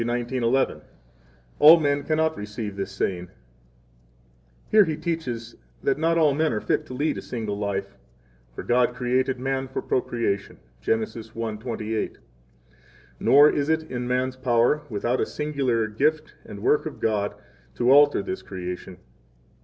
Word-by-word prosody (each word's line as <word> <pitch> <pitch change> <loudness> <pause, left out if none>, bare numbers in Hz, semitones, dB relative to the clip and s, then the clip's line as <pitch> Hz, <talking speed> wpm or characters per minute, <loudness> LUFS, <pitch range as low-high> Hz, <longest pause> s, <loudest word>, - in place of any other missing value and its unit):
19:11: 120 +2 0 0.8
All 160 +3 +9
men 145 -2 +1
cannot 160 +1 +1
receive 105 0 -6
this 100 0 -4
saying, 90 -2 -3 1.4
where 215 -1 +7
He 160 -4 -2
teaches 125 -9 -4 0.3
that 135 +1 +1
not 165 +1 +2
all 155 -3 +4
men 155 +2 +1
are 105 - -1
fit - - -1
to 130 - -7
lead 150 +4 -1
a - - -7
single 110 -4 -4
life; 100 -1 -3 0.6
for - - -6
God 125 0 +2
created 125 +1 0
man 135 0 -2
for 130 - -4
procreation, 115 -5 -2 0.2
Gen. 110 - +1
1:28. 110 0 -4
6 - - -24 1.0
Nor 145 +2 +6
is 145 +1 -1
it 160 0 +1
in 125 -1 -3
man's 130 +1 -1
power, 125 +3 +2
without 120 +3 -1
a - - +2
singular 135 -7 -1
gift 150 +8 0
and 100 0 -9
work 150 +5 +2
of 155 - -8
God, 105 -2 0 0.4
to 120 +2 +2
alter 145 +1 +6
this 190 0 -4
creation. 90 -1 -7
125 Hz, 145 wpm, -24 LUFS, 110-145 Hz, 1.4 s, All